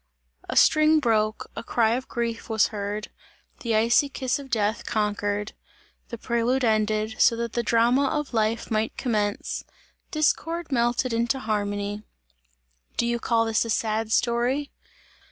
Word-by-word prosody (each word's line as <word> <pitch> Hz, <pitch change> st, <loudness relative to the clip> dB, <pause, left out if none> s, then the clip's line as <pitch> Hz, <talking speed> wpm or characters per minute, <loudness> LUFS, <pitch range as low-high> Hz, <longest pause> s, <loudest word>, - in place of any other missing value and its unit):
A -, -, -3 dB
string 310 Hz, 0 st, +5 dB
broke, 215 Hz, -5 st, 0 dB
a -, -, -4 dB
cry 230 Hz, -1 st, +2 dB
of 255 Hz, +2 st, -2 dB
grief 235 Hz, 0 st, -3 dB
was 220 Hz, -2 st, +3 dB
heard, 210 Hz, 0 st, -4 dB, 0.5 s
the 230 Hz, -3 st, -1 dB
icy 235 Hz, +6 st, +3 dB
kiss 260 Hz, 0 st, -2 dB
of 275 Hz, -1 st, -10 dB
death 215 Hz, -2 st, 0 dB
conquered; 205 Hz, -1 st, -1 dB, 0.6 s
the 235 Hz, -, -6 dB
prelude 235 Hz, +3 st, 0 dB
ended; 215 Hz, -1 st, +1 dB
so 230 Hz, -, +5 dB
that 235 Hz, 0 st, -4 dB
the 240 Hz, -, 0 dB
drama 235 Hz, +4 st, +3 dB
of 295 Hz, -2 st, -2 dB
life 220 Hz, +1 st, 0 dB
might 220 Hz, 0 st, -1 dB
commence, 210 Hz, -5 st, -1 dB, 0.5 s
discord 325 Hz, +2 st, 0 dB
melted 240 Hz, 0 st, +1 dB
into 235 Hz, +2 st, +1 dB
harmony. 205 Hz, -3 st, -2 dB, 1.0 s
Do 235 Hz, -, +2 dB
you 235 Hz, 0 st, 0 dB
call 230 Hz, -1 st, +1 dB
this 225 Hz, -1 st, +1 dB
a 230 Hz, -, -6 dB
sad 220 Hz, 0 st, -1 dB
story? 245 Hz, +5 st, +1 dB
230 Hz, 145 wpm, -25 LUFS, 215-245 Hz, 1.0 s, string